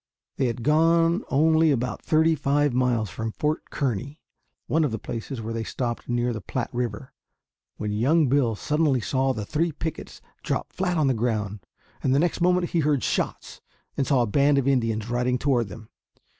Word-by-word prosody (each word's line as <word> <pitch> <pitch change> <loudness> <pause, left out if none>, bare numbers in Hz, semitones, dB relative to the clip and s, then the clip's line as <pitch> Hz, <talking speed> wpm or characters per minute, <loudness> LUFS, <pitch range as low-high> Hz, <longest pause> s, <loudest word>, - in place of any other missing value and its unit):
They 130 - +1
had 115 0 -4
gone 165 - +3
only 160 +3 +4
about 125 -3 -1
thirty 160 +1 +3
five 145 -1 +1
miles 120 -5 +1
from 110 +5 -4
Fort 150 +7 -2
Kearny, 135 +2 -3 0.5
one 160 +1 +1
of 150 - +1
the 110 - -3
places 115 +3 -6
where 115 +1 -4
they 115 0 -2
stopped 120 0 -4
near 120 0 0
the 110 - -5
Platte 125 +4 -4
River, 120 0 -4 0.6
when 105 - -3
young 140 +9 +3
Bill 125 -4 +2
suddenly 150 +2 +1
saw 130 +3 0
the 110 -5 -4
three 160 +7 0
pickets 160 +1 -6 0.2
drop - - -3
flat 180 -2 -1
on 155 - +2
the 135 - +3
ground, 110 -3 -2 0.4
and 130 0 +2
the - - +4
next 170 +1 0
moment 180 0 +2
he 170 - +1
heard 145 -3 +1
shots - - -2 0.3
and 135 - -1
saw 130 -4 +3
a - - +1
band 140 +6 +3
of 135 -1 +1
Indians 115 -5 +1
riding 125 +1 0
toward 125 -4 +1
them. 105 +3 -11
130 Hz, 185 wpm, -25 LUFS, 115-150 Hz, 0.6 s, only